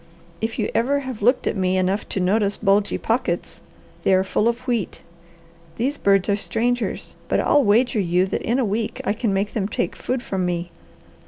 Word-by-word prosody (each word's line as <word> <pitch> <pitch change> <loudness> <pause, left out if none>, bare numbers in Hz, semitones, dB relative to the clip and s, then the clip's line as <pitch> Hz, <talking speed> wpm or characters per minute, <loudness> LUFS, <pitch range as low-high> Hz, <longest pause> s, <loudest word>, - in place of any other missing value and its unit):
If 225 +1 -2
you 215 - -1
ever 280 +4 +1
have 260 -5 -6
looked 245 +5 +3
at - - 0
me 185 -1 +1
enough 190 +3 0
to - - -2
notice 200 +2 +1
bulgy 200 0 +2
pockets, 225 -7 -2 0.4
they 190 - +3
are 185 - +3
full 210 +3 +1
of 235 +2 -1
wheat. 235 -7 -2 0.7
These 270 +8 -1
birds 195 -2 +3
are 200 - +3
strangers, 240 +4 -2
but - - +1
I'll 290 - +4
wager 230 +2 +3
you 180 -1 +2
that 190 - -3
in 235 - 0
a 260 - +2
week 220 +4 -2
I 205 - +1
can 220 -1 -1
make 195 +1 -1
them 200 -4 -1
take 180 -4 -2
food 250 -1 -3
from 190 -2 -2
me. 175 -1 -2
210 Hz, 195 wpm, -22 LUFS, 195-240 Hz, 0.7 s, I'll